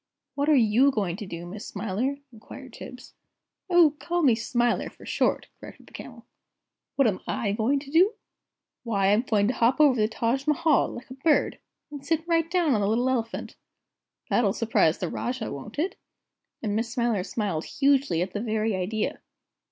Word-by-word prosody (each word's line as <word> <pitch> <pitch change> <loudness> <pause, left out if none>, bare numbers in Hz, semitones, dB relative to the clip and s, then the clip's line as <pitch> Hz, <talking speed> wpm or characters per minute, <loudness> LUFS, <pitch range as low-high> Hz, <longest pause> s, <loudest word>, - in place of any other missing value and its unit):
"What 285 +2 0
are 305 - +6
you 240 +2 +4
going 200 -9 -1
to 210 -2 -7
do, 170 -1 -7
Miss 200 +4 -8
Smiler?" 220 +7 -2 0.2
inquired 255 +3 -12
Tibbs. 250 0 -11 0.6
"Oh, 345 -4 +5
call 345 0 -1
me 260 -5 +5
Smiler, 240 +1 0
for - - -16
short!" - - 0
corrected - - -12
the - - -20
Camel. - - -10 0.7
"What 275 -3 +4
am 195 -4 0
I 205 - -1
going 225 +7 +1
to 280 -1 -11
do? 370 +8 +4 0.7
Why, 200 -5 +1
I'm 210 +2 +4
going 210 -5 +1
to - - 0
hop 240 +4 +2
over 295 -3 +6
the 215 - +3
Taj 235 +5 -1
Mahal, 305 -1 +3
like 250 +2 -10
a - - -5
bird, 295 +4 +1 0.3
and 290 -2 -8
sit 320 +3 -1
right 330 -1 +1
down 345 -5 +2
on 210 - +1
the 200 - +1
little 235 +4 +1
Elephant. 230 -3 -3 0.8
That'll 210 -5 +3
surprise 220 -8 +2
the 180 - -3
Rajah, 245 +5 -4
won't 175 - -8
it?" 340 +6 -1 0.7
and 205 -2 -1
Miss 230 +1 -1
Smiler 235 -4 0
smiled 195 -6 -3
hugely 275 - +2
at 185 +1 -7
the 205 - -3
very 220 -2 -1
idea. 210 +4 -2
235 Hz, 185 wpm, -26 LUFS, 210-280 Hz, 0.8 s, are